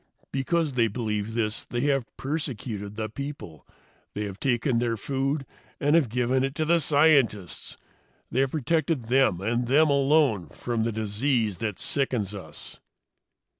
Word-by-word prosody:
Because 150 Hz, +2 st, 0 dB
they 115 Hz, -2 st, +3 dB
believe 110 Hz, -1 st, -3 dB
this, 110 Hz, -2 st, -1 dB
they 120 Hz, -, -3 dB
have 135 Hz, -3 st, +1 dB
persecuted 125 Hz, -8 st, -3 dB
the 110 Hz, 0 st, -2 dB
people. 125 Hz, -, -8 dB, 0.5 s
They 105 Hz, -, -2 dB
have 100 Hz, -2 st, -6 dB
taken 125 Hz, -1 st, +1 dB
their 115 Hz, -1 st, 0 dB
food 135 Hz, +4 st, -1 dB, 0.3 s
and 145 Hz, +1 st, +2 dB
have 155 Hz, -8 st, +3 dB
given 125 Hz, +3 st, +1 dB
it 135 Hz, +1 st, -2 dB
to 155 Hz, -, 0 dB
the 170 Hz, +2 st, +4 dB
scientists. 140 Hz, -, +2 dB, 0.5 s
They 125 Hz, -, 0 dB
have 135 Hz, 0 st, +3 dB
protected 155 Hz, -3 st, 0 dB
them, 125 Hz, -9 st, +3 dB
and 120 Hz, +4 st, 0 dB
them 150 Hz, +4 st, +4 dB
alone, 140 Hz, -, +3 dB
from 115 Hz, -2 st, -2 dB
the 115 Hz, -, 0 dB
disease 110 Hz, 0 st, 0 dB
that 105 Hz, -5 st, -2 dB
sickens 125 Hz, -8 st, -1 dB
us. 95 Hz, -6 st, -8 dB
125 Hz, 150 wpm, -26 LUFS, 110-140 Hz, 0.5 s, the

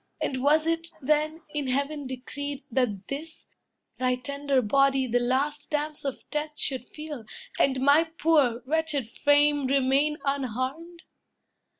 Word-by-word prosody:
And 260 Hz, -2 st, -2 dB
was 305 Hz, +3 st, +4 dB
it, 330 Hz, 0 st, -1 dB
then, 305 Hz, +3 st, 0 dB
in 295 Hz, -2 st, -2 dB
heaven 280 Hz, +2 st, -1 dB
decreed, 285 Hz, +2 st, -6 dB
that 220 Hz, -6 st, 0 dB
this, 315 Hz, +3 st, -6 dB, 0.5 s
Thy 255 Hz, 0 st, +2 dB
tender 280 Hz, 0 st, -1 dB
body 270 Hz, +4 st, +3 dB
the 245 Hz, 0 st, +1 dB
last 275 Hz, +4 st, 0 dB
damps 300 Hz, -1 st, -2 dB
of 275 Hz, -, -4 dB
death 300 Hz, 0 st, -3 dB
Should 260 Hz, -3 st, -2 dB
feel, 300 Hz, -5 st, -7 dB, 0.4 s
and 265 Hz, -1 st, +3 dB
my 285 Hz, +4 st, +5 dB
poor, 300 Hz, -7 st, +2 dB
wretched 295 Hz, -5 st, 0 dB
frame 290 Hz, -1 st, +3 dB
remain 275 Hz, +3 st, +2 dB
Unharmed? 275 Hz, +6 st, -3 dB
280 Hz, 130 wpm, -27 LUFS, 260-300 Hz, 0.5 s, my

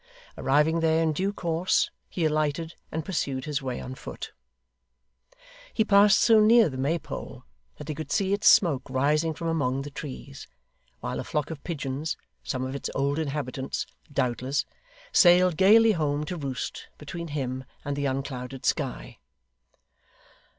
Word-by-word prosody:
Arriving 150 Hz, +4 st, +2 dB
there 160 Hz, 0 st, +2 dB
in 160 Hz, -1 st, +1 dB
due 190 Hz, +6 st, 0 dB
course, 175 Hz, -2 st, 0 dB, 0.2 s
he 170 Hz, -, -1 dB
alighted 155 Hz, +1 st, 0 dB, 0.2 s
and 160 Hz, -1 st, -3 dB
pursued 135 Hz, -7 st, -2 dB
his 150 Hz, -1 st, -2 dB
way 130 Hz, -2 st, -4 dB
on 130 Hz, -, -6 dB
foot. -, -, -8 dB, 1.4 s
He 220 Hz, -, +3 dB
passed 200 Hz, 0 st, +6 dB
so 225 Hz, -2 st, +6 dB
near 225 Hz, -2 st, +6 dB
the 130 Hz, -, -7 dB
Maypole, 150 Hz, +5 st, -3 dB, 0.3 s
that -, -, -9 dB
he 155 Hz, -, -2 dB
could 155 Hz, +1 st, -7 dB
see 195 Hz, 0 st, +1 dB
its 205 Hz, +1 st, +1 dB
smoke 160 Hz, -12 st, +5 dB
rising 150 Hz, +5 st, +1 dB
from 165 Hz, -, -4 dB
among 135 Hz, -5 st, 0 dB
the 145 Hz, -, -8 dB
trees, 140 Hz, -1 st, -8 dB, 0.5 s
while -, -, -3 dB
a -, -, -3 dB
flock 150 Hz, +1 st, -2 dB
of 150 Hz, -3 st, -8 dB
pigeons 145 Hz, -1 st, -3 dB, 0.3 s
some 130 Hz, -1 st, -3 dB
of 130 Hz, -, -4 dB
its 140 Hz, -, -4 dB
old 140 Hz, +2 st, 0 dB
inhabitants, 140 Hz, -3 st, -3 dB, 0.3 s
doubtless 130 Hz, +1 st, 0 dB, 0.5 s
sailed 180 Hz, -, +6 dB
gaily 220 Hz, +6 st, +6 dB
home 150 Hz, -5 st, 0 dB
to 180 Hz, -, -4 dB
roost, 140 Hz, -5 st, -5 dB
between 170 Hz, +3 st, -6 dB
him 130 Hz, -3 st, -3 dB, 0.2 s
and 145 Hz, 0 st, -2 dB
the 140 Hz, 0 st, -1 dB
unclouded 130 Hz, -1 st, -4 dB
sky. -, -, -2 dB
150 Hz, 150 wpm, -27 LUFS, 135-170 Hz, 1.4 s, passed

